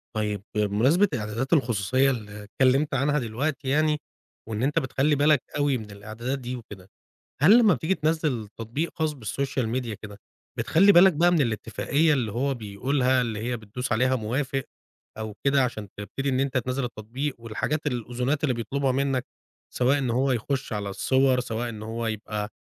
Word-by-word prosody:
طيب 105 -2 -2
بمناسبة 115 - +3
إعدادات 115 +6 -2
الخصوصيّة 130 - +2
اللي 105 -3 -6
اتكلّمت 135 +7 +2
عنها 145 +3 +2
دلوقتي 135 +4 -3
يعني، 150 +1 +2 0.5
وإن 110 +2 -2
أنتَ 145 +2 +2
بتخلّي 135 +3 +1
بالك 145 -1 +3
أوي 145 -2 +2
من 110 -3 -9
الإعدادات 110 +6 -5
دي 125 0 -5
وكده. 105 -5 -11 0.5
هل 195 - +8
لمّا 215 -7 +5
بتيجي 160 +9 0
تنزّل 155 - -1
تطبيق 120 +9 -3
خاص 155 -1 +1
بالسوشيال 130 0 -2
ميديا 120 -2 -2
كده 105 0 -11 0.4
بتخلّي 195 +5 +5
بالك 185 +1 +7
بقى 170 +4 +3
من 170 - +3
الاتفاقية 140 +5 +1
اللي 120 -7 0
هو 135 +4 0
بيقولها، 125 +4 0
اللي 115 -4 -2
هي 120 +3 -2
بتدوس 115 +3 -5
عليها 130 +3 +2
موافق 130 +4 -2 0.5
أو 110 -1 -5
كده 140 -1 +4
عشان 110 -4 -4
تبتدي 135 +7 -4
إن 130 -1 +1
أنتَ 135 -1 +1
تنزّل 125 +2 -2
التطبيق، 125 +5 -4
والحاجات 120 +7 -3
الأذونات 125 +3 -1
اللي 130 -4 +2
بيطلبها 130 +4 -1
منّك، 135 -1 0 0.5
سواء 130 +3 +3
إن 130 -3 -1
هو 130 +3 +2
يخش 130 +2 -2
على 105 -1 -3
الصور 130 +5 +2
سواء 120 0 -3
إن 110 -2 -7
هو 115 +1 -4
يبقى 105 -1 -3
125 Hz, 165 wpm, -26 LUFS, 110-140 Hz, 0.5 s, هل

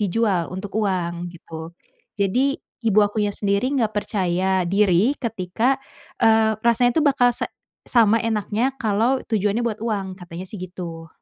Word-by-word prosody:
dijual 200 -3 +1
untuk 190 +2 -6
uang 175 -5 -1
gitu. 165 0 -10 0.4
Jadi, 245 +8 +1 0.2
ibu 220 -3 +2
akunya 205 0 0
sendiri 200 +4 0
enggak 225 -5 +1
percaya 190 -3 0
diri 195 +5 +3
ketika, 225 +2 0 0.4
eee, 220 -1 +4
rasanya 235 +2 +3
tuh 310 - +3
bakal 275 -4 +4
se - - -2 0.4
sama 230 -3 +4
enaknya 225 +3 0
kalau 230 +4 +2
tujuannya 210 0 +1
buat 220 -3 -2
uang, 195 -4 -2
katanya 175 -1 -8
sih 215 - -8
gitu. 170 -3 -7
205 Hz, 140 wpm, -22 LUFS, 185-230 Hz, 0.4 s, eee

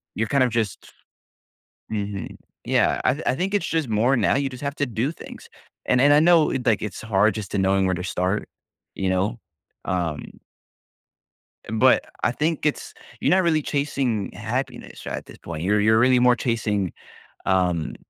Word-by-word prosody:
you're 110 0 -1
kind 140 +1 +3
of 125 - +2
just 110 -5 -3 1.0
Mhm, 100 -2 -4 0.3
yeah, - - +2
I 140 +5 +1
I - - +2
think 190 +5 -2
it's 205 - 0
just 160 -7 -1
more 115 +5 +2
now. - - +2
You 140 0 0
just 125 +2 -10
have 140 0 -2
to 145 - 0
do 120 +5 -1
things. - - -12 0.4
And 125 - +2
and 145 +1 +6
I 150 - +6
know, 170 -2 +5 0.2
like, 115 -4 +2
it's 105 - -5
hard 105 -1 +2
just 105 -3 -6
to 100 - -1
knowing 95 0 +2
where 95 - +1
to 90 - -5
start. 90 +3 -1 0.5
You 95 -1 -1
know, 100 +6 0 0.5
um 85 -5 -2 1.4
But 125 +4 +4 0.2
I - - +3
think 155 +3 -1
it's 150 - -1 0.3
you're - - +1
not 190 0 +4
really 160 -2 +2
chasing 135 -7 -1
happiness - - -5
right - - -3
at - - -9
this - - -13
point. 85 -1 -7
You're 105 +2 +2
you're 110 +1 +4
really 125 0 +4
more 125 0 +5
chasing, 105 -6 -1 0.5
um, 90 -4 +1
115 Hz, 180 wpm, -23 LUFS, 100-140 Hz, 1.4 s, and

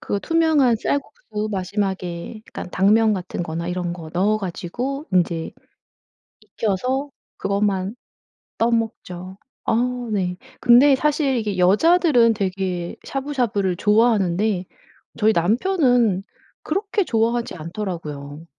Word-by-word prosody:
그 205 - -2
투명한 315 -7 +3
쌀국수 215 -4 -3
마지막에 190 0 -3
그러니까 - - -7
당면 215 +3 +4
같은 185 -2 -3
거나 170 +1 -4
이런 180 -1 -2
거 165 -3 -8
넣어 200 +5 +2
가지고 215 - -4
인제 170 -2 +1 1.1
익혀서 255 +7 0 0.3
그것만 200 0 0 0.6
떠먹죠. 220 -6 -2 0.3
어 - - +2 0.4
네. 180 -3 -1 0.2
근데 265 +3 +6
사실 285 -1 +1
이게 210 -4 -2
여자들은 240 - +4
되게 185 -3 -3
샤브샤브를 245 -10 -1
좋아하는데 210 -3 +2 0.5
저희 220 0 +4
남편은 240 - +2 0.4
그렇게 405 +4 0
좋아하지 230 -1 0
않더라고요. 165 -4 -6
210 Hz, 260 characters per minute, -22 LUFS, 180-245 Hz, 1.1 s, 근데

